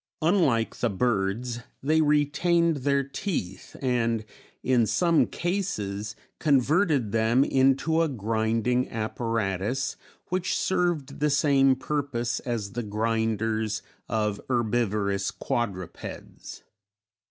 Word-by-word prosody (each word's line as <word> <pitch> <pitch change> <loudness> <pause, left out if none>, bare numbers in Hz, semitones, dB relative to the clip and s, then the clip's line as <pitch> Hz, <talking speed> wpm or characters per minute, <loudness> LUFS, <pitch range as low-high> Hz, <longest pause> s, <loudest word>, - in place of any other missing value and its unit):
Unlike 155 - +2
the 120 - +1
birds, 115 +2 -1 0.2
they 155 +3 +3
retained 155 +3 +2
their 140 +1 +1
teeth 140 - -4
and 115 -3 +1 0.4
in 120 -4 +3
some 170 - +3
cases 110 - -3 0.2
converted 145 - +2
them 115 +4 +3
into 135 +5 +2
a 165 - +3
grinding 115 +1 0
apparatus 110 +1 -2 0.3
which 185 0 0
served 175 -7 0
the 150 +1 +2
same 140 -2 +4
purpose 130 -3 -2
as 115 -5 -3
the 120 - -3
grinders 110 0 -1 0.3
of 105 -2 -1
herbivorous 105 -5 0
quadrupeds. 95 -7 -5
120 Hz, 95 wpm, -26 LUFS, 110-145 Hz, 0.4 s, same